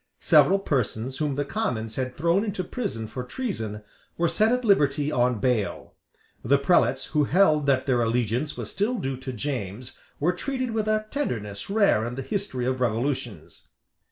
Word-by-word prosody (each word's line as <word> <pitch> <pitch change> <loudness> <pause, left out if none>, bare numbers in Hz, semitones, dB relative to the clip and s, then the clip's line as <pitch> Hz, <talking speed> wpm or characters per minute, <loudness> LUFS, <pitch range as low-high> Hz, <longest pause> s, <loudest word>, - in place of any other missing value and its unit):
Several 195 - +5
persons 130 - -2
whom 150 -3 0
the 145 +1 -1
Commons 115 - -2
had 130 -1 -3
thrown 170 +6 +2
into 205 -4 -2
prison 175 - -4
for 125 +3 -5
treason 120 - -4 0.3
were 170 - +2
set 215 +7 +2
at 250 0 0
liberty 150 -7 +3
on 125 -3 +2
bail, 115 -2 -1 0.5
The 140 +4 +4
prelates 140 -2 +2
who 150 -2 +3
held 155 -3 +3
that 130 -2 +2
their 125 -3 +2
allegiance 120 +4 0
was - - -5
still 210 +6 0
due 135 - -3
to 130 0 -6
James 120 -2 -5 0.2
were 175 +5 +2
treated 255 +5 -3
with 220 -1 -1
a 215 0 +1
tenderness 105 - -3
rare 200 - +3
in 120 - -5
the 135 - -4
history 195 - -3
of 130 0 -1
revolutions. 125 +4 -2
140 Hz, 170 wpm, -25 LUFS, 125-195 Hz, 0.5 s, Several